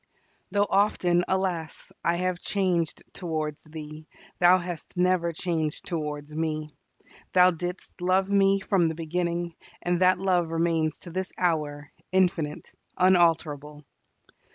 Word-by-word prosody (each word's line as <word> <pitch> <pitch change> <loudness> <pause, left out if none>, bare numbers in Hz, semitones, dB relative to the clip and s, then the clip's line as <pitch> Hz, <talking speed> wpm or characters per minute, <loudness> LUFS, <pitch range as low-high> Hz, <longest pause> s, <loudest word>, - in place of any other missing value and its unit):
Though 205 0 +2
often, 180 -3 +2
alas! 185 -4 -2
I 170 - +2
have 180 0 -1
changed 180 -6 0
towards 155 -4 -3
Thee, 155 0 -9 0.3
Thou 180 0 +7
hast 175 -1 -7
never 180 -1 +2
changed 160 -2 -2
towards 150 -2 -4
me. 155 -1 -2 0.6
Thou 180 0 +7
didst 180 +2 -6
love 185 +2 +2
me 195 -1 +3
from 195 -4 +2
the 160 - -2
beginning, 170 +1 -2 0.3
and 175 0 0
that 185 0 +5
love 180 -2 +1
remains 165 -2 0
to 175 - -9
this 185 +2 -3
hour, 150 -4 -1 0.2
infinite, 175 -5 0 0.2
unalterable! 160 -5 +2
175 Hz, 125 wpm, -26 LUFS, 155-185 Hz, 0.6 s, Thou